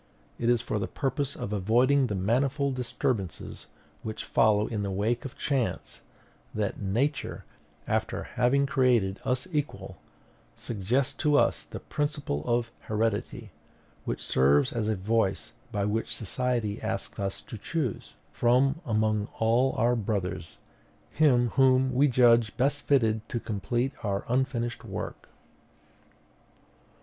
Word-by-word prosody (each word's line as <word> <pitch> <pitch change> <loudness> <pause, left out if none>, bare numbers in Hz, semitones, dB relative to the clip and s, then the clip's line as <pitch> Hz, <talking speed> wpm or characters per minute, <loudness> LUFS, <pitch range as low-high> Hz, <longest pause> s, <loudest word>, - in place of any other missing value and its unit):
It 120 - +1
is 120 -1 +3
for 110 - -2
the - - -2
purpose 140 0 -2
of 105 - -4
avoiding 125 +7 +3
the 105 - -2
manifold 135 +8 +1
disturbances 120 -6 -3 0.3
which 110 0 -5
follow 110 -2 +3
in 110 -3 -3
the 100 - -2
wake 110 +6 -1
of 135 - -7
chance 135 -5 -2 0.5
that 105 -1 -2
Nature, 125 +9 -1 0.4
after 110 0 -1
having 140 +3 +2
created 125 -8 +2
us 125 +1 -1
equal, 100 - -3 0.6
suggests 120 +5 -1
to 150 -2 +3
us - - +2
the - - -8
principle 145 - -2
of 120 -1 +1
heredity; 110 -1 -2 0.5
which - - -4
serves 70 - +3
as 115 -3 -1
a 110 - +1
voice 110 +2 0 0.2
by 100 -3 -1
which 110 +2 -2
society 115 -1 -1
asks - - -4
us 100 -1 -2
to - - -9
choose, 130 +3 -3 0.2
from 135 +6 +2
among 110 -1 +1
all 120 +4 +2
our 120 +2 +3
brothers, 95 - -3 0.5
him 125 -6 +4
whom 130 +1 +3
we 140 +4 +4
judge 120 -3 +4
best 140 +2 0
fitted 110 -5 +2
to 120 - -2
complete 120 +5 -1
our 100 -2 -1
unfinished 120 -1 -1
work. - - -6
115 Hz, 130 wpm, -28 LUFS, 105-130 Hz, 0.6 s, him